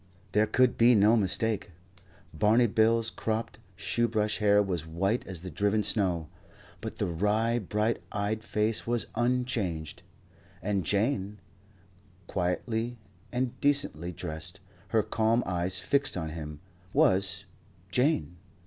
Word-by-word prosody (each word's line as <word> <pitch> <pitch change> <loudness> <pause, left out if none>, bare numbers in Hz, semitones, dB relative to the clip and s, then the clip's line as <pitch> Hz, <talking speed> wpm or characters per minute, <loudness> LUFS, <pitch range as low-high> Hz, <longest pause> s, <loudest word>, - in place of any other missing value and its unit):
There 105 +3 +3
could 125 +3 +2
be 120 +1 +6
no 105 +2 +5
mistake. 110 0 +1 0.6
Barney 110 +3 +4
Bill's 115 +1 +2
cropped, 110 0 -3 0.2
shoe 100 +5 0
brush 105 -2 0
hair 105 -1 +4
was 90 -5 -3
white 95 +8 0
as 90 -4 -4
the 90 0 -7
driven 105 +6 +1
snow; 90 -8 +2 0.5
but - - -5
the - - -1
wry, 105 +7 +1
bright 105 +2 -1
eyed 105 +1 -2
face 105 +1 0
was 120 -1 0
unchanged. 120 -10 -1 0.6
And 100 -2 -1
Jane, 105 - 0 0.9
quietly 110 +7 -2 0.3
and 125 0 -2
decently 140 - +2
dressed, 90 +2 -5 0.3
her 110 -2 +2
calm 115 +3 +1
eyes 90 +1 -1
fixed 140 +5 +1
on 80 -2 -3
him, 75 -2 -7 0.3
was 95 0 +3 0.5
Jane. 90 - +1
105 Hz, 125 wpm, -29 LUFS, 90-115 Hz, 0.9 s, be